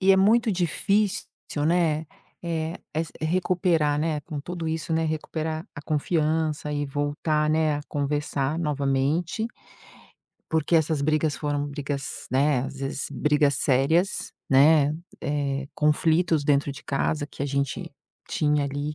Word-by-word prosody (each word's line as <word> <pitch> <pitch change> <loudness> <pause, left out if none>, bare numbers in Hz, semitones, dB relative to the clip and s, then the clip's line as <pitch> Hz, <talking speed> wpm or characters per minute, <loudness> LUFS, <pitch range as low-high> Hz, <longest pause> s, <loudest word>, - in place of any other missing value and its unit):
e 190 0 +4
é - - +5
muito 220 +4 +4
difícil, 195 +3 +1 0.4
né, 165 -2 +2 0.4
eh, 165 -1 -2 0.2
s 160 0 -2
recuperar, 165 -2 +1
né, 155 -1 0
com 145 0 -6
tudo 170 +2 -5
isso, 160 +1 -3
né, 160 0 +2
recuperar 155 0 -3
a 145 - -8
confiança 155 0 0
e 145 0 -1
voltar, 145 +2 0
né, 155 -1 +2
a - - -4
conversar 145 0 -1
novamente. 150 +6 0 1.0
Porque 160 +1 +2
essas 160 -2 +1
brigas 155 0 +1
foram 145 -1 -1
brigas, 140 -2 -4
né, 135 +1 +3
às 135 - -6
vezes, 135 0 -3
brigas 145 +1 +2
sérias, 150 +8 +2 0.2
né, 145 +2 +5 0.3
eh, 140 -2 -1
conflitos 160 +1 +2
dentro 145 0 +2
de 140 - -12
casa 145 +1 -1
que 140 - -7
a - - 0
gente 140 -1 -2 0.4
tinha 150 -1 +1
ali 145 +2 -3
150 Hz, 135 wpm, -25 LUFS, 145-160 Hz, 1.0 s, é